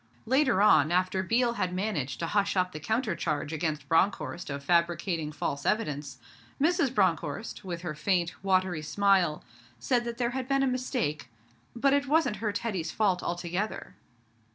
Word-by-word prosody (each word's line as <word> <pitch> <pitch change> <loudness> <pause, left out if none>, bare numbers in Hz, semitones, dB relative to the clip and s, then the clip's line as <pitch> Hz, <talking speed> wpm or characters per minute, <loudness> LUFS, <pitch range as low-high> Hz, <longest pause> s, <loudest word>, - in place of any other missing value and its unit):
Later 255 -4 +3
on, 155 -7 +5
after 185 +1 +1
Biel 235 +5 +1
had 180 0 -1
managed 185 -9 -2
to - - 0
hush 200 +2 0
up 185 0 +1
the 155 - -7
counter 220 - -1
charge 150 -1 -2
against 150 -3 -2
Bronckhorst 175 +1 0
of 140 0 -5
fabricating 170 0 +1
false 140 -1 -3
evidence, 150 -10 -1 0.4
Mrs. 320 -2 +2
Bronckhorst, 185 - -1
with 175 -2 -5
her 165 -4 -3
faint, 175 +2 0
watery 185 -4 +1
smile, 185 -1 +2 0.3
said 245 -3 +1
that 235 -1 -4
there 240 -1 0
had 255 0 -4
been 275 0 +2
a - - +3
mistake, 250 - -2 0.5
but 275 +3 +3
it 285 0 +1
wasn't 300 -7 +2
her 210 +1 -1
Teddy's 205 -6 -3
fault 195 -4 +1
altogether. 175 +4 -3
185 Hz, 160 wpm, -28 LUFS, 165-230 Hz, 0.5 s, on